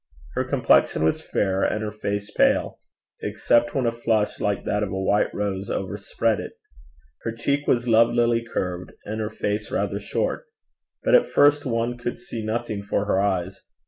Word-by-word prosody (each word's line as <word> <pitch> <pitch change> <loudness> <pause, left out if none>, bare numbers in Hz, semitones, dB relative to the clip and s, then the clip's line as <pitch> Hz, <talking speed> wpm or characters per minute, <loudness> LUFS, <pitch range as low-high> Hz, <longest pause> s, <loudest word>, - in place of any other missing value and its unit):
Her 130 - 0
complexion 125 - +3
was 80 - +1
fair, 95 -1 0
and 110 - 0
her 105 - -3
face 100 0 -4
pale, - - +2 0.4
except 120 0 +1
when 135 -3 +1
a 115 - +2
flush, 115 -2 0
like 100 -1 -1
that 105 - 0
of 105 - -1
a 95 - -2
white 100 +2 +2
rose, 100 -1 -3
overspread 100 +3 -1
it. - - -6 0.7
Her 115 - -3
cheek 140 +5 -1
was 120 0 +2
lovelily 115 +1 +4
curved, 90 -5 -4
and 110 +1 -3
her 105 - -2
face 105 0 -3
rather - - -1
short. - - -2 0.6
But - - +2
at - - +6
first 145 0 +4
one 120 0 -1
could 120 0 -3
see 115 -2 -7
nothing 110 -1 -2
for 100 0 -1
her 100 -2 +1
eyes. 95 -2 -1
110 Hz, 175 wpm, -24 LUFS, 100-120 Hz, 0.7 s, at